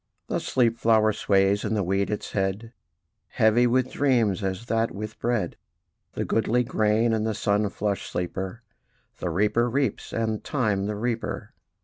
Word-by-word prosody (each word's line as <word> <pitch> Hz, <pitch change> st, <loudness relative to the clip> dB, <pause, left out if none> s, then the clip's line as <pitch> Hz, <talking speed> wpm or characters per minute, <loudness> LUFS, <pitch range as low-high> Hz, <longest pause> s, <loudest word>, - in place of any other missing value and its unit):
The -, -, -1 dB
sleep 115 Hz, -2 st, +1 dB
flower 110 Hz, -1 st, +4 dB
sways 100 Hz, 0 st, +2 dB
in 110 Hz, 0 st, -1 dB
the 105 Hz, -, +1 dB
wheat 95 Hz, +2 st, 0 dB
its 105 Hz, -, -4 dB
head, 100 Hz, +4 st, -2 dB, 0.5 s
Heavy 110 Hz, +3 st, +3 dB
with 130 Hz, +1 st, +1 dB
dreams, 115 Hz, -8 st, +2 dB
as 95 Hz, +4 st, -3 dB
that 115 Hz, 0 st, +1 dB
with 110 Hz, +1 st, -7 dB
bread: 115 Hz, -7 st, -1 dB, 0.6 s
The -, -, -2 dB
goodly 115 Hz, +2 st, +1 dB
grain 110 Hz, 0 st, +2 dB
and 110 Hz, -1 st, 0 dB
the 110 Hz, -1 st, -1 dB
sun 105 Hz, +1 st, +1 dB
flushed 100 Hz, 0 st, -2 dB
sleeper 95 Hz, +5 st, -4 dB, 0.6 s
The 90 Hz, -, -2 dB
reaper 105 Hz, +7 st, +2 dB
reaps, 130 Hz, -3 st, -1 dB
and 110 Hz, -2 st, -2 dB
Time 105 Hz, -8 st, 0 dB
the 105 Hz, -, -2 dB
reaper. 115 Hz, +2 st, -3 dB
110 Hz, 155 wpm, -25 LUFS, 100-115 Hz, 0.6 s, flower